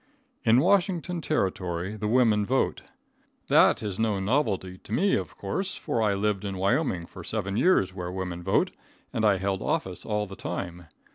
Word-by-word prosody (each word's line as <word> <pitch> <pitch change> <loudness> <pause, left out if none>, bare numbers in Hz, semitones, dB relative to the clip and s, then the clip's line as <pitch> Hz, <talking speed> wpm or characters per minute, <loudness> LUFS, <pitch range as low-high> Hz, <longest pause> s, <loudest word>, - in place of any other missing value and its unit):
In 115 +3 +5
Washington 180 -2 +1
Territory 95 - -1
the 105 0 -3
women 110 -3 +4
vote. 130 +6 0 0.7
That - - +5
is 100 -2 -4
no 110 -3 +1
novelty 95 -5 0
to - - -15
me, 195 - +2
of - - -2
course, 190 0 -3
for 145 -7 -1
I 105 -2 +2
lived 105 0 0
in 100 -2 -4
Wyoming 100 - +1
for 90 - -11
seven 100 0 -2
years 105 - +3
where 90 -2 -5
women 90 -2 -4
vote, 95 +2 +1 0.4
and 110 - -1
I 105 -3 +4
held 95 0 -1
office 95 -2 -2
all 105 -1 -1
the 95 -1 -9
time. 90 -3 -5
105 Hz, 170 wpm, -27 LUFS, 95-120 Hz, 0.7 s, In